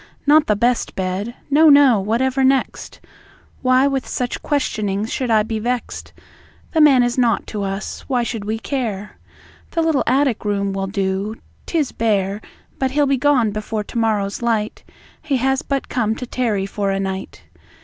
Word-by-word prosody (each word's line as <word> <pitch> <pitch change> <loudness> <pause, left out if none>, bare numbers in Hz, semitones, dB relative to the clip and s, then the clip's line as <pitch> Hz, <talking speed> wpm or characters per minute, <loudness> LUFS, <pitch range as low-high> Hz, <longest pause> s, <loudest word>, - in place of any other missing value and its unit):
Not 300 +1 +5
the 210 - +3
best 240 +3 0
bed! 190 +5 -3 0.2
No, 310 +2 +6
no. 280 -6 +6
Whatever 255 +6 0
next? 265 0 0 0.6
Why 255 +1 +4
with 270 -2 -1
such 245 -1 -3
questionings 215 -7 -1
should 255 -2 -2
I 215 -2 +4
be 220 0 -3
vext? 245 +2 -3 0.6
The 320 - +3
man 275 -5 +6
is 245 +1 0
naught 235 -3 +2
to 210 - -5
us; 195 +1 -4
why 250 -3 +1
should 225 -3 -4
we 215 +2 -2
care? 220 -5 -4 0.5
The 330 - 0
little 320 -4 +2
attic 265 -1 +2
room 200 -1 -1
will 195 0 -2
do; 195 +1 -2 0.3
'tis 310 -5 0
bare, 205 -2 0 0.4
But 265 - +1
he'll 290 +2 +2
be 275 -1 +2
gone 255 -5 +2
before 215 +1 -3
to 235 - -8
morrow's 210 -3 0
light; 225 -3 -1 0.4
He 295 -4 0
has 265 +2 +1
but 275 -1 -3
come 220 -3 0
to 250 - -6
tarry 230 -6 -1
for 200 0 -2
a 195 0 0
night. 190 -1 -5
230 Hz, 170 wpm, -20 LUFS, 205-265 Hz, 0.6 s, No